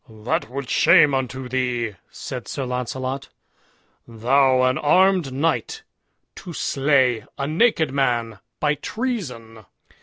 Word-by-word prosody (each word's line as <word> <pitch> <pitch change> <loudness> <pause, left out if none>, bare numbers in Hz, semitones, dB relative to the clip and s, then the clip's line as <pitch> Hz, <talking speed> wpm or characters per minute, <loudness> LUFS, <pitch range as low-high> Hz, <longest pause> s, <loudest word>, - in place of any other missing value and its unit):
"That 110 +1 -3
were 140 +2 -4
shame 145 +2 +5
unto 130 -1 -3
thee," 125 -3 -1 0.2
said 125 -3 -7
Sir 135 -3 -4
Launcelot; 130 +2 -4 0.8
"thou 130 +3 +2
an 130 +1 +2
armed 180 -1 +3
knight 165 - -1 0.5
to 175 - -9
slay 135 -6 +1
a 140 - -2
naked 160 - +2
man 120 -6 -1 0.2
by 150 -1 +2
treason." 145 - -5
130 Hz, 115 wpm, -22 LUFS, 125-150 Hz, 0.8 s, shame